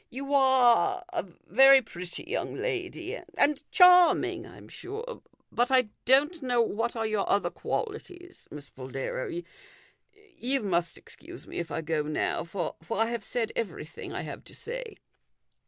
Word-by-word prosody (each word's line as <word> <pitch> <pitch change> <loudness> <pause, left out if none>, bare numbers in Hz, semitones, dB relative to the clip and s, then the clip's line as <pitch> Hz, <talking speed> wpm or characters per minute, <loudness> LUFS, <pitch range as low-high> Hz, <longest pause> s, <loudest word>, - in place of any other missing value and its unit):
You 275 +3 -5
are 265 - +4
a 350 - -1 0.2
very 270 +6 +7
pretty 180 -4 -8
young 395 +9 -3
lady, 375 -1 -4 0.2
and 295 0 +2
charming, 360 -1 +5
I - - -14
am - - -14
sure. 450 +6 -7 0.3
But 240 +2 +1
I 255 -4 +3 0.2
don't 295 +6 +4
know 250 -2 0
what 230 +1 0
are 225 -1 -1
your 215 -2 -1
other 200 - +2
qualities, 370 -5 -5
Miss 145 -1 -9
Boldero. 130 0 -5 1.1
You 265 0 -1
must 175 -4 -1
excuse - - -12
me - - -6
if 170 -1 -4
I - - -3
go 160 -1 -1
now, 150 0 -1
for 170 0 -4
I 225 +2 +1
have 235 -3 -3
said 230 +1 -2
everything 170 -7 -5
I - - -4
have - - -7
to - - -13
say." - - -6
255 Hz, 155 wpm, -28 LUFS, -, 1.1 s, very